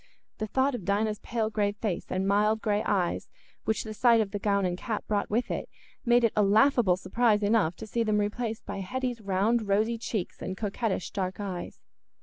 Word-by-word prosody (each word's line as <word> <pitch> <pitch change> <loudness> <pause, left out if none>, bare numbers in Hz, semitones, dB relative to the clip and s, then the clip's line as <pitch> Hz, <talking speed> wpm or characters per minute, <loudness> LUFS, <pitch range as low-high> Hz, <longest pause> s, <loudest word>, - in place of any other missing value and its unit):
The 215 - -2
thought 265 +5 +1
of 240 -6 -4
Dinah's 210 +3 0
pale 225 -2 -2
grave 205 -1 0
face 205 -6 -3
and 190 +1 -1
mild 210 +2 +3
grey 210 -1 0
eyes, 180 -4 0 0.4
which 220 - 0
the 220 - -6
sight 235 +1 +4
of 210 -3 0
the 205 - -3
gown 200 -1 +1
and 180 -1 0
cap 215 +4 -4
brought 205 -1 -1
with 235 +4 0
it, - - -3 0.3
made 240 -1 +4
it 230 - +3
a 210 - +4
laughable 210 -1 +4
surprise 210 +3 +2
enough 205 -5 +2
to - - -8
see 230 +2 -2
them 215 -2 +2
replaced 220 +2 -2
by - - -5
Hetty's 245 +4 -3
round 205 +3 +1
rosy 220 +4 +1
cheeks 215 -5 -4
and 185 - -4
coquettish 210 -2 -2
dark 185 0 -3
eyes. 190 -4 -5
210 Hz, 200 wpm, -28 LUFS, 200-230 Hz, 0.4 s, sight